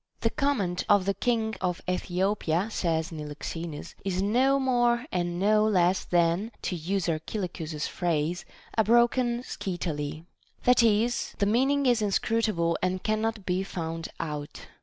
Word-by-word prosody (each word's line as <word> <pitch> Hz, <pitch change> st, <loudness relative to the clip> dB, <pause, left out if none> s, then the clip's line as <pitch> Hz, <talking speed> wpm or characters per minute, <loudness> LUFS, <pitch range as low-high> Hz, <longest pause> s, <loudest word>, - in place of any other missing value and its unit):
The -, -, +1 dB
command 205 Hz, -12 st, 0 dB
of 205 Hz, -3 st, +5 dB
the 200 Hz, -, +1 dB
king 225 Hz, 0 st, 0 dB
of 180 Hz, -2 st, -1 dB
Ethiopia, 180 Hz, 0 st, 0 dB
says 165 Hz, -5 st, -1 dB
Niloxenus, 155 Hz, +1 st, -6 dB
is 185 Hz, -1 st, -1 dB
no 250 Hz, +8 st, +3 dB
more 240 Hz, -2 st, +2 dB
and 175 Hz, -1 st, -1 dB
no 210 Hz, +2 st, +4 dB
less 185 Hz, -3 st, +2 dB
than 175 Hz, +5 st, +1 dB
(to 180 Hz, -, -1 dB
use 180 Hz, +3 st, -2 dB
Archilochus's 160 Hz, -2 st, -3 dB
phrase) 170 Hz, 0 st, -1 dB, 0.3 s
a 220 Hz, -, +4 dB
broken 240 Hz, +2 st, +3 dB
scytale; 160 Hz, -, -4 dB, 0.4 s
that 250 Hz, 0 st, +5 dB
is, 230 Hz, +1 st, +2 dB
the 200 Hz, -, +2 dB
meaning 270 Hz, +6 st, +2 dB
is 240 Hz, -3 st, +3 dB
inscrutable 205 Hz, -4 st, +1 dB
and 185 Hz, 0 st, -1 dB
cannot 215 Hz, -1 st, -1 dB
be 180 Hz, +1 st, 0 dB
found 165 Hz, -4 st, -4 dB
out. 150 Hz, -2 st, -5 dB
190 Hz, 140 wpm, -27 LUFS, 170-225 Hz, 0.4 s, of